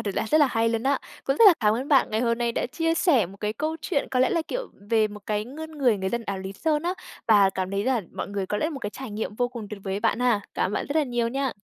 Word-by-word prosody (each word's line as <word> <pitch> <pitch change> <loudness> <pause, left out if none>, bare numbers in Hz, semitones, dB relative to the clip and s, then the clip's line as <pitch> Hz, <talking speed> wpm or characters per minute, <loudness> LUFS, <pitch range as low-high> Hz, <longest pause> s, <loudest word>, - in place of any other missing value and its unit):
là - - 0
rất 310 - +6
là 295 -3 +5
hay 230 -2 +1
luôn 230 +1 -1
á. 275 0 +2 0.3
Cũng 270 - 0
rất 455 - +7
là 370 - +9
cảm 210 -1 +3
ơn 260 +5 -3
bạn 275 -4 +4
ngày 220 +2 0
hôm 235 -1 +1
nay 235 -1 0
đã - - -1
chia 330 +5 0
sẻ 320 - +3
một 195 +3 -12
cái 210 0 -2
câu 310 +6 -2
chuyện 310 -7 -1
có 255 - +1
lẽ 260 - +4
là, 335 - +1
kiểu, - - -4 0.2
về 220 -2 +3
một 210 0 -10
cái 210 0 -1
ngươn 315 +5 -8
người 245 -7 +3
người 190 0 -2
dân 235 -1 -2
áo 195 -1 -3
Lý 190 +1 -6
Sơn 305 +6 0
á. 355 +1 0 0.3
Và 205 -3 +6
cảm 190 0 -3
thấy 200 +1 -1
là 255 -3 +1
mọi - - -5
người 200 -1 -3
có 210 - -2
lẽ 305 - 0
là - - -1
một 280 -4 -6
cái 205 - -4
trải 260 -1 -8
nghiệm 210 0 -4
vô 245 +1 +1
cùng 235 -4 -8
tuyệt 210 -2 -7
vời 190 -1 -3
ấy 200 - -2
bạn 225 - +1
ha. 240 -5 +2
Cảm 185 - 0
ơn - - -4
bạn - - -1
rất 285 - -4
là 310 - +4
nhiều 240 -3 -1
nha. 270 +1 -1
235 Hz, 330 wpm, -25 LUFS, 210-280 Hz, 0.3 s, là